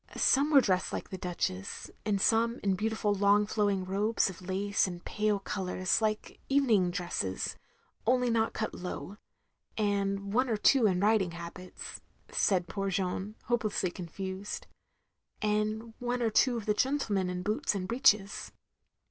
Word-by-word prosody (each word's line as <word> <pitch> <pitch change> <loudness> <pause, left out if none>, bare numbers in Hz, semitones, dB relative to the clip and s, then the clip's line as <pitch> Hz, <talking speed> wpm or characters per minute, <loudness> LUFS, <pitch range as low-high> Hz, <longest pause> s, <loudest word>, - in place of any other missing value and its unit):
'* - - -12
"Some 280 +3 +4
were 285 -3 +7
dressed 185 -5 +1
like - - -4
the 190 - -4
Duchess; 170 - -3 0.2
and 200 -2 +1
some 230 +3 +3
in 195 -2 +2
beautiful 215 +1 0
long 205 +1 +4
flowing 205 -3 0
robes 200 +2 +1
of 185 - -13
lace 195 +2 0
and 175 -1 -7
pale 210 -1 +1
colours 185 0 -1
like 215 -1 -2
evening 235 -10 +3
dresses 175 - -2 0.5
only 250 0 +3
not 225 0 +2
cut 220 - -3
low; 185 +2 -6 0.6
and 200 -1 0
one 255 +2 +2
or 220 - +1
two 235 +2 +5
in 180 -2 +1
riding 205 -4 +3
habits"; 170 +2 -8 0.3
said 180 -3 +2
poor 195 +2 -2
Jeanne, 190 +2 -2
hopelessly 215 -6 0
confused. 190 - -6 0.7
"And 215 +2 -1
one 245 0 -1
or 225 - +1
two 245 +2 +3
of 220 - -5
the 210 - +2
gentlemen 210 -7 0
in 180 0 -3
boots 210 +1 0
and 185 -2 -3
breeches. 210 -4 +2
205 Hz, 155 wpm, -30 LUFS, 185-225 Hz, 0.7 s, were